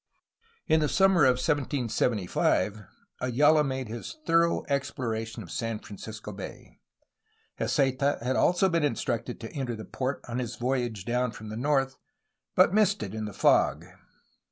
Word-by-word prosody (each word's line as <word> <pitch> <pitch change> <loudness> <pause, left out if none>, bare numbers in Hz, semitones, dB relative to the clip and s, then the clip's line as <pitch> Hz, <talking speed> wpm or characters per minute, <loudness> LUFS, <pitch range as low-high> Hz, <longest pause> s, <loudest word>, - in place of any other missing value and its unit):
In 160 0 +3
the 150 -1 +1
summer 190 -6 +4
of 130 -1 +5
1775 115 - 0 0.4
Ayala 150 +5 +4
made 130 -3 -3
his 115 - -7
thor 165 0 +5
ough - - -2
exploration 115 -5 -2
of 85 - -12
San 115 -2 -2
Francisco 105 +1 -9
Bay. 100 -1 -10 0.8
Heceta 140 0 +1
had 130 +2 0
also 180 +6 +3
been 170 -3 +1
instructed 120 -3 -2
to 115 - -7
enter 130 -5 -3
the 110 - -8
port 130 +1 -3
on 120 +1 -3
his 120 -2 -4
voyage 120 -4 -2
down 125 +1 0
from 110 0 -9
the 110 - -5
north, 135 +1 +1 0.6
but - - +5
missed 215 - +3
it 100 -1 -6
in 110 -1 -3
the 105 - -5
fog. 80 -4 +3
125 Hz, 155 wpm, -28 LUFS, 110-145 Hz, 0.8 s, of